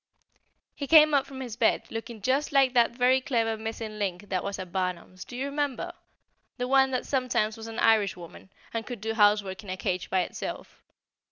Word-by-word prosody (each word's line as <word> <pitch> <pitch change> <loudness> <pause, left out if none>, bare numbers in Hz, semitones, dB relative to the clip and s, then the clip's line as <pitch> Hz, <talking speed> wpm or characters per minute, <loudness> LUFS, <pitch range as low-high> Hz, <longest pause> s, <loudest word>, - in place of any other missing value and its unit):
He 280 - -5
came 305 -1 +7
up 275 -1 +3
from 265 -1 -8
his 240 -4 -6
bed 230 -1 +2
looking 225 -2 -7
just 275 +4 +1
like 270 -2 +4
that 240 -2 +5
very 250 +2 +2
clever 230 -4 0
Missing 220 -1 -6
Link 195 0 -3
that 185 -2 -1
was 200 0 -4
at 185 -2 -7
Barnum's, 185 0 -3
do 245 - -9
you 265 - -2
remember? 280 -2 -2 0.7
the 250 0 -2
one 265 0 +4
that 255 -1 -2
sometimes 250 -5 0
was 225 0 -9
an 225 0 -7
Irishwoman, 195 -5 +1 0.2
and 230 -1 -2
could 245 -3 -6
do 225 +2 -3
housework 205 -2 +2
in 200 - -11
a 185 - -3
cage 185 -1 -2
by 185 - +2
itself. - - -6
225 Hz, 195 wpm, -27 LUFS, 200-260 Hz, 0.7 s, came